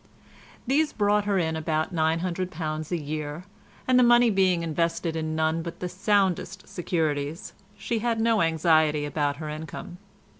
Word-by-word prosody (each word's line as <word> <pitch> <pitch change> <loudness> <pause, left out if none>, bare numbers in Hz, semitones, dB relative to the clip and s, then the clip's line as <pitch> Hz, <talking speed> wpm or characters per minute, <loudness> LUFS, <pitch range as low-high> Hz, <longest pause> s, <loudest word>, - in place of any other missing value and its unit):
These 295 +4 +1
brought 205 0 +2
her 200 -1 +1
in 160 -3 0
about 160 +2 -1
£900 165 -1 -2
a 175 - +1
year, 150 +1 -5 0.4
and 255 0 +5
the - - +6
money 240 -1 +5
being 185 -3 +2
invested 165 +1 -1
in 155 -1 -2
none 160 +1 +1
but 170 0 -7
the 180 - -3
soundest 190 0 0
securities, 160 -3 -2 0.2
she 225 +3 -2
had 230 0 0
no 225 -1 +3
anxiety 160 -2 +3
about 145 0 -1
her 155 +1 -7
income. 155 +3 -7
165 Hz, 150 wpm, -26 LUFS, 155-195 Hz, 0.4 s, the